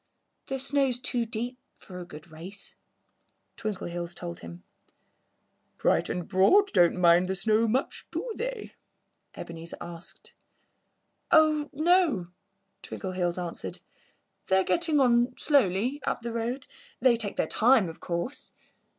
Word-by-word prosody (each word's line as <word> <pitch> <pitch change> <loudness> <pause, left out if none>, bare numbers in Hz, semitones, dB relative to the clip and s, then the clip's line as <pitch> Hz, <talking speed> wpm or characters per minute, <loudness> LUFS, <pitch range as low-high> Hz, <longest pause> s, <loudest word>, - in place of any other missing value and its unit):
"The 270 - -2
snow's 270 -1 +1
too 245 -1 -1
deep 240 +3 -4 0.2
for 180 -1 -10
a 175 - -7
good 155 0 -12
race," 175 +6 -8 0.8
Twinkleheels 175 -5 -4
told 175 0 -6
him. 85 +1 -10 1.1
"Bright - - +2
and 180 -2 -3
Broad 215 - +5
don't 175 -3 +4
mind 175 0 +5
the 190 - -1
snow 220 +3 +2
much, 255 +5 -1
do - - -4
they?" - - -5 0.6
Ebenezer 165 0 -7
asked. 170 0 -9 1.0
"Oh, 310 -2 +5
no!" 310 - +2 0.5
Twinkleheels 185 -2 -3
answered. 175 -2 -4 0.7
"They're 190 0 +4
getting 320 - +2
on 245 -1 +3
slowly, 255 - +2
up 240 - -2
the 235 -1 -4
road. 240 +3 -3 0.3
They 250 -1 +5
take 220 -3 -4
their - - +1
time, 230 -3 +4
of 165 - -9
course." 175 +10 -4
220 Hz, 125 wpm, -28 LUFS, 175-270 Hz, 1.1 s, Broad